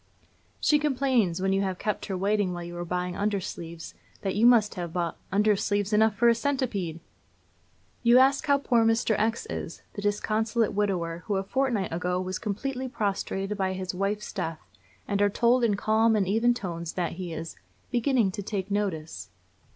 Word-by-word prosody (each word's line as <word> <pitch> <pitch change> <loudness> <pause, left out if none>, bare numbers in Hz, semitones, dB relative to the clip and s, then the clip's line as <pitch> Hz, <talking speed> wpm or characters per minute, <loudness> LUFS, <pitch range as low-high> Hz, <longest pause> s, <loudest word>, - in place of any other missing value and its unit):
She 300 - +3
complains, 255 - +1
when 190 0 +2
you 195 - +2
have 190 -2 -2
kept 210 +1 -3
her 190 - -2
waiting 200 -1 +1
while 175 0 -5
you 175 0 -7
were 175 0 -4
buying 180 +1 -2
undersleeves, 175 -5 -4 0.3
that 195 -2 -1
you 220 +4 +4
must 225 -4 +5
have 175 -3 -5
bought 170 -1 -2 0.2
'undersleeves 205 0 +1
enough 220 0 +4
for 235 +3 +3
a 235 - +7
centipede.' 230 - -2 1.0
You 240 0 +6
ask 275 +3 +4
how 280 -1 +5
poor 240 -4 +2
Mr. 225 0 +2
X 225 +2 0
is - - -6
the 205 - -6
disconsolate 215 +2 0
widower 180 -5 -1
who 205 - 0
a 190 - 0
fortnight 235 -5 -1
ago 180 +1 -1
was 185 0 -3
completely 255 +5 -3
prostrated 200 -3 -2
by 190 -1 0
his 185 0 -4
wife's 200 +3 -2
death, 165 -5 -4 0.4
and 200 - 0
are 205 - +4
told 240 +4 +3
in 215 -3 +3
calm 220 +2 +3
and 200 -3 +1
even 230 +4 +3
tones 170 -6 -5
that 175 -2 -1
he 180 -1 -6
is 160 0 -6 0.4
'beginning 240 -4 +2
to 205 - -5
take 200 -1 -4
notice.' 160 - -3
205 Hz, 180 wpm, -27 LUFS, 185-230 Hz, 1.0 s, a